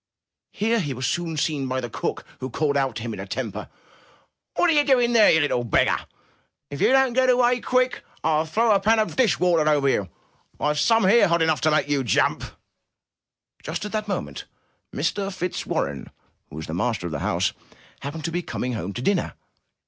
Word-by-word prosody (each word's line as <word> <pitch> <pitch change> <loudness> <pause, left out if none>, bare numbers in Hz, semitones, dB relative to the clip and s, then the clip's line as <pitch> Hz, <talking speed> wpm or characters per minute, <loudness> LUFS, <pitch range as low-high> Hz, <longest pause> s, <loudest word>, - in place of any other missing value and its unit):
Here 225 +3 0
he 145 -9 -3
was 130 +1 -3
soon 165 +2 -2
seen 145 -3 -1
by 130 0 -1
the 120 - -4
cook, 115 - -4
who 130 - -5
called 145 +3 -1
out 135 -4 0
to 110 - -5
him 115 -2 -4
in - - -8
a 95 - -6
temper: 105 -2 -5 0.9
*'What - - +3
are 330 - +4
you 295 -1 +4
doing 250 -4 +3
there, 225 -3 +6
you 160 - +5
little 135 -4 0
beggar? 115 - +1 0.6
If 140 - -6
you - - +5
don't 265 -2 +3
get 255 +1 +3
away 245 0 +3
quick, 255 0 0 0.2
TU 155 0 +2
throw 225 +7 +2
a 200 - +4
panful 220 +3 +3
of - - -11
dish 255 -5 +2
water 170 -4 +3
over 145 -2 +2
you! 100 -8 0 0.5
Tve 150 0 0
some 225 +6 +3
here 210 0 +5
hot 170 -1 +2
enough 160 -1 +1
to 155 - +3
make 155 -1 +1
you 145 -2 0
jump!" 115 - +1 1.2
Just - - -5
at 210 - -6
that 215 -1 -3
moment, 75 - -4 0.5
Mr. 195 +6 -2
Fitzwarren, 175 - -3 0.4
who - - -11
was 80 0 -6
the 80 - -6
master 100 +1 -1
of 85 - -4
the 75 - -3
house, - - 0 0.5
happened 145 +2 -6
to 165 - -2
be 175 +1 -1
coming 125 -6 -4
home 100 -3 -4
to 120 - -5
dinner. 200 +1 0
160 Hz, 205 wpm, -23 LUFS, 130-215 Hz, 1.2 s, there